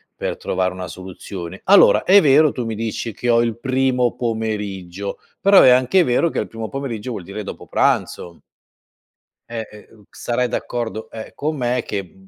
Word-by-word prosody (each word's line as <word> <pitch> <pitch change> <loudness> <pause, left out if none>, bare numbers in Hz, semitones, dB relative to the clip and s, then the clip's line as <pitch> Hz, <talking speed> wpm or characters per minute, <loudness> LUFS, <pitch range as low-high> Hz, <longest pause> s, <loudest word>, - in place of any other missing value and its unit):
per - - -4
trovare 95 0 -1
una 90 0 -6
soluzione. 95 0 -8
Allora, 200 +1 +6
è 200 +2 +6
vero 150 +1 +5
tu 125 - -4
mi 115 -1 -3
dici 115 +1 -4
che 120 - -3
"Ho 115 0 +4
il 115 -2 -1
primo 130 -1 +1
pomeriggio," 105 -5 -4 0.2
però 200 0 +7
è - - +7
anche 130 +9 +4
vero 140 +4 +2
che - - -6
al - - -2
primo 115 -1 -7
pomeriggio 130 -4 -5
vuol 105 -6 -6
dire 100 +4 -7
dopo - - -8
pranzo. 85 -1 -1 1.1
E 115 -1 -4
e 105 0 -14
ehm, 110 -2 -19
sarai 125 +1 -2
d'accordo, 115 -2 -4
ehm, 110 -1 -8
con 155 +2 -2
me, 125 -2 0
mhmm, 125 - -1
che 100 -3 -5
115 Hz, 180 wpm, -20 LUFS, 100-125 Hz, 1.1 s, però